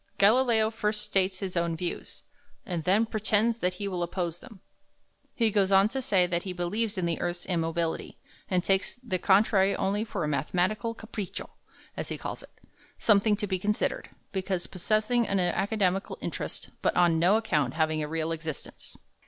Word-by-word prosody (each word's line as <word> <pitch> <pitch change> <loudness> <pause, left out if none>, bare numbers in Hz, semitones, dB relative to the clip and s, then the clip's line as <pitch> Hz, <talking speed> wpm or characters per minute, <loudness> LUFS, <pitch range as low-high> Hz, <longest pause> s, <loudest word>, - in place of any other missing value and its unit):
Galileo 220 +1 +4
first 210 -1 0
states 190 -2 +1
his 190 -2 -4
own 170 -1 0
views, 175 +1 -5 0.4
and 170 -4 -3
then 205 +5 +4
pretends 220 +1 +1
that 180 -2 0
he 200 +2 -4
will 180 -3 -3
oppose 175 -1 -2
them. 215 - -14 0.8
He 225 -2 +2
goes 200 -1 +2
on 195 +2 +5
to 265 +3 -3
say 195 -7 +3
that 175 -1 0
he 185 0 -5
believes 205 +5 -1
in 180 - 0
the 170 -1 -1
earth's 175 0 -3
immobility, 165 -2 -2 0.3
and 180 -2 +1
takes 195 0 +1
"the 185 -7 -1
contrary 195 0 +4
only 205 +2 0
for 210 -6 -4
a - - 0
mathematical 180 - 0
Capriccio," 220 -4 -6 0.4
as - - -4
he - - -3
calls - - -6
it; - - -14 0.5
something 210 0 +4
to 205 - -3
be 190 -2 -1
considered, 210 +3 -1 0.2
because 190 -2 -2
possessing 215 +5 +1
an 195 - +1
academical 195 +1 0
interest, - - -5
but - - +1
on 170 -2 +4
no 185 +6 +5
account 150 - 0
having 155 -1 +1
a 150 - -2
real 160 +1 -2
existence. 160 -3 -7
190 Hz, 175 wpm, -28 LUFS, 175-215 Hz, 0.8 s, on